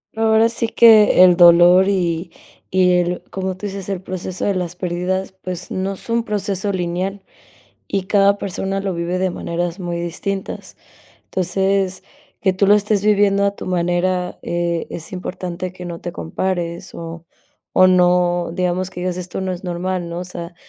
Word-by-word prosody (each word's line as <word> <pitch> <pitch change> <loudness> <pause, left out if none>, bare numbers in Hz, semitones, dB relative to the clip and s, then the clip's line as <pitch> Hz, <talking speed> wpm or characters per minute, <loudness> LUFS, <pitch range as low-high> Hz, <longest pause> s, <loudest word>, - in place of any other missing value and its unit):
Ahora 225 0 +4
sí 230 0 -1
que 220 -5 +6
el 180 -1 +6
dolor 175 +2 +7
y 175 -3 -1 0.4
y 180 -1 +4
el, 175 0 -1
como 190 -1 -3
tú 205 +2 -6
dices, 195 -1 -6
el 190 -2 -3
proceso 185 -1 -5
de 200 - +1
las 180 -1 -3
pérdidas, 180 +2 -2
pues 180 -1 -5
no 190 +1 -2
es 195 - -10
un 230 0 +1
proceso 200 -2 -2
lineal 185 +2 -3 0.7
y 195 -2 -1
cada 200 0 +3
persona 195 0 -3
lo 195 -2 -2
vive 170 +2 -2
de 185 0 0
maneras 175 +2 -3
muy 175 -1 -3
distintas. 190 +3 -5 0.5
Entonces, 190 +1 0 0.4
que 190 -2 +2
tú 195 +1 +1
lo 205 - +7
estés 210 0 +1
viviendo 200 -1 +3
a 200 0 +1
tu - - -8
manera, 180 0 -1
eh, 170 -1 -2
es 165 +3 -7
importante 180 0 -5
que 180 -1 -10
no 170 -1 -6
te 175 - -6
compares 170 - -3
o 165 0 -8 0.5
o 185 - +6
no 180 -1 +3
digamos 185 +1 -1
que 180 - -8
digas: 180 0 -2
"Esto 180 +1 -5
no 190 -1 -2
es 180 - -7
normal", 180 0 -3
¿no? 170 +1 -5
O - - -5
sea, 175 -1 -8
185 Hz, 175 wpm, -19 LUFS, 175-195 Hz, 0.7 s, dolor